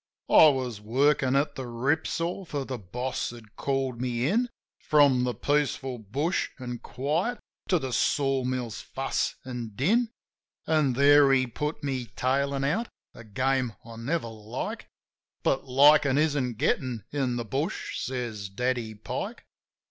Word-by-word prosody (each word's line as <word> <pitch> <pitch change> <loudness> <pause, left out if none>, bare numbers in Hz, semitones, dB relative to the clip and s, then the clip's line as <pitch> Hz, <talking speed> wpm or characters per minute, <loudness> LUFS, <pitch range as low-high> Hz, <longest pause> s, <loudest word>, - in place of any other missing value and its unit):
I 160 - +9
was 130 -7 0
workin' 135 +4 +2
at 140 +2 +2
the 130 -3 -6
rip 135 +7 0
saw; 175 +4 -2
for 145 -6 -4
the 130 -2 -5
boss 125 +7 -3
had 115 -3 -12
called 135 -3 -1
me 125 0 0
in, 240 +8 +1 0.3
From 140 -5 +4
the 125 - -1
peaceful 135 -3 0
bush 140 - -1
an' 125 -3 -5
quiet 155 - -1 0.3
to 180 - +4
the 130 -5 -4
sawmill's 130 -5 0
fuss 135 0 -2
an' 120 -4 -5
din; 220 - +2 0.6
An' 155 -5 +2
there 140 +1 +6
he 130 -1 +4
put 150 +5 -4
me 130 -4 -2
tailin' 135 +2 0
out 200 +12 0
— - - -68
a 115 - -11
game 130 +2 0
I 115 -1 -10
never 135 +4 -2
like; 110 +2 -6 0.6
But, 135 - +1
"Likin' 140 +1 +6
isn't 140 -6 +1
gettin' 120 -2 0
in 135 -4 0
the 120 -1 -3
bush," 145 - -3
says 120 -6 -4
Daddy 120 +1 -2
Pike. 105 - -5
130 Hz, 150 wpm, -27 LUFS, 120-145 Hz, 0.6 s, I